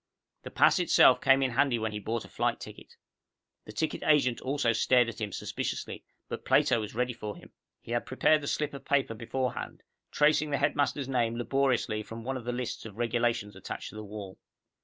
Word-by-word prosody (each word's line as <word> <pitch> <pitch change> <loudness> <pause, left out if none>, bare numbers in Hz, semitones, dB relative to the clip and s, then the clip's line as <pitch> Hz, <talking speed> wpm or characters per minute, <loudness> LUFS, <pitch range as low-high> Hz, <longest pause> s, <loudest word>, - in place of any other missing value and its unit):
The - - -8
pass - - +4
itself - - +5
came 135 0 +4
in 130 - 0
handy 125 0 +2
when 110 -1 -2
he 105 - -4
bought 115 +2 -3
a - - -11
flight - - -1
ticket. - - -11 0.7
The - - -9
ticket 135 +10 -2
agent 140 -6 +2
also 130 -3 +1
stared 120 +1 +3
at 115 - -9
him 105 -1 -2
suspiciously, - - -4 0.2
but - - -6
Plato 120 - +3
was 105 0 -7
ready 125 +1 0
for 105 -3 -6
him. - - -15 0.3
He - - -10
had 120 0 -1
prepared 150 +4 +3
the 145 - -6
slip 150 0 -1
of 140 - -8
paper 135 -5 +1
beforehand, 120 +2 -4 0.3
tracing 150 0 +3
the 140 - 0
headmaster's 145 -1 0
name 120 -3 0
laboriously 125 -3 0
from 115 +1 -9
one 135 +3 -3
of 125 -3 -6
the 125 - -1
lists 125 0 -4
of 110 -2 -10
regulations 115 -3 0
attached 95 - -7
to - - -13
the 110 - -6
wall. 100 -2 -9
120 Hz, 200 wpm, -29 LUFS, 110-135 Hz, 0.7 s, itself